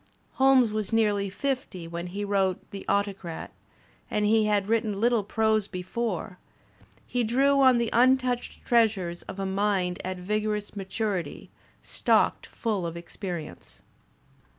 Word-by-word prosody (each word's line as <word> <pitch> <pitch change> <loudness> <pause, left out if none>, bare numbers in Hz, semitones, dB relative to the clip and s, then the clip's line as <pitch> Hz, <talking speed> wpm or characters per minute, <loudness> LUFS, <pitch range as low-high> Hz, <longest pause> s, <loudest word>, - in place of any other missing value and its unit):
Holmes 265 -4 +5
was 215 -1 -2
nearly 205 -3 +2
fifty 225 -7 -3
when 170 +1 -5
he 200 +3 -4
wrote 195 -2 +1
"The 195 - -8
Autocrat" 200 -4 -2 0.6
and 210 - 0
he 215 +1 +4
had 205 -2 +1
written 220 -2 +1
Uttle 230 +2 +2
prose 220 -2 +1
before; 185 0 -4 0.7
he 245 -1 -1
drew 275 +5 +3
on 260 -2 +6
the 235 -1 0
untouched 250 0 +2
treasures 205 -7 +2
of - - -9
a 195 - -2
mind 190 -2 0
at 185 0 -4
vigorous 210 +2 -2
maturity, 195 -1 -3 0.3
stocked - - +1
full 215 -5 -2
of 165 0 -6
experience. 170 - -7
210 Hz, 130 wpm, -27 LUFS, 185-230 Hz, 0.7 s, on